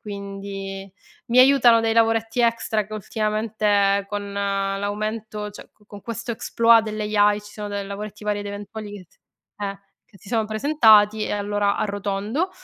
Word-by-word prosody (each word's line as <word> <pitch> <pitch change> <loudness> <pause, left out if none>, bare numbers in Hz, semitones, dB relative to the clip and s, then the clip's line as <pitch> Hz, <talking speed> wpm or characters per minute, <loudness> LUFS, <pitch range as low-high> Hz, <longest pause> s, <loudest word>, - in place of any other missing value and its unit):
quindi 195 -1 -7 0.4
mi 240 +2 +2
aiutano 255 -3 +6
dei 225 0 +1
lavoretti 225 +1 +2
extra 230 -3 +1
che 215 - -14
ultimamente 210 -1 0
con 205 -1 -5
l'aumento 205 +2 -3
cioè 205 - -12
co 210 - -28
con 205 -1 -12
questo 230 +2 -6
exploit 230 0 +3
delle 215 -1 -4 0.2
AI 205 0 +4
ci 205 - -14
sono 210 -1 -6
de 200 0 -3
lavoretti 210 +1 -7
varie 210 -1 -1
ed 205 - -7
eventuali 205 +1 -7
che 200 -3 -9
t 175 - -32 0.5
eh, 200 -1 -4 0.3
che 195 - -20
si 195 - -16
sono 225 -2 +1
presentati 215 -3 +4
e - - -3
allora 205 0 0
arrotondo. 205 - -2
210 Hz, 160 wpm, -23 LUFS, 200-220 Hz, 0.5 s, aiutano